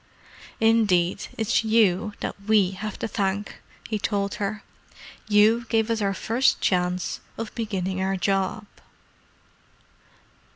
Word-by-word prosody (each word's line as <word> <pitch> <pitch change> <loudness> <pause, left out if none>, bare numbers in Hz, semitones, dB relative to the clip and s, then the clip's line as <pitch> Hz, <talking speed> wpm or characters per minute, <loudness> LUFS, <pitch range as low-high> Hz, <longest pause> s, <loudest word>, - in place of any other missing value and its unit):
"Indeed, 205 -6 +2
it's 225 +1 +1
you 215 -3 +2
that - - -3
we 200 -2 +3
have 205 +3 -6
to - - -3
thank," 200 -1 -2 0.3
he 215 -2 -2
told 200 -1 -1
her. 205 +1 -3 0.6
"You 220 +3 +4
gave 225 0 +1
us 225 -1 0
our 195 -1 0
first 240 +7 +1
chance 180 -1 0 0.2
of 225 -1 -5
beginning 190 -5 -3
our 190 0 0
job." 195 +2 0
205 Hz, 120 wpm, -25 LUFS, 190-220 Hz, 0.6 s, You